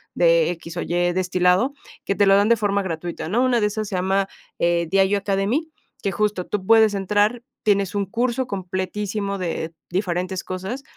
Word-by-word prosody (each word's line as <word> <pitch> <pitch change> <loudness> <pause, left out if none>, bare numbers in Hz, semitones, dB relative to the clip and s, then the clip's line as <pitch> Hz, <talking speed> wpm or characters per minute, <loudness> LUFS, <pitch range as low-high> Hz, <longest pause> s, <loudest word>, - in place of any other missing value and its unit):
de 170 -1 +4
X 165 -1 -8
o - - -1
Y - - -4 0.2
destilado", 180 +7 +2 0.3
que 195 - -1
te 205 - +4
lo 195 0 +6
dan 205 +2 +3
de 235 - +5
forma 200 -1 +1
gratuita, 170 -3 -4
¿no? 235 +7 +2
Una 250 -3 +2
de 210 - +3
esas 215 0 -3
se - - -3
llama, 190 +2 +1 0.3
eh, 170 -1 +1
Diageo 195 +2 +3
Academy, 200 +11 0 0.3
que 200 - -1
justo 210 -3 -1
tú 195 -2 -3
puedes 220 -1 +5
entrar, 210 +4 +1 0.2
tienes 200 -2 +2
un 200 -1 0
curso 240 +4 -1
completísimo 200 +1 -3
de 165 -2 -3 0.2
diferentes 185 0 -2
cosas, 190 +9 -5
195 Hz, 180 wpm, -22 LUFS, 180-210 Hz, 0.3 s, lo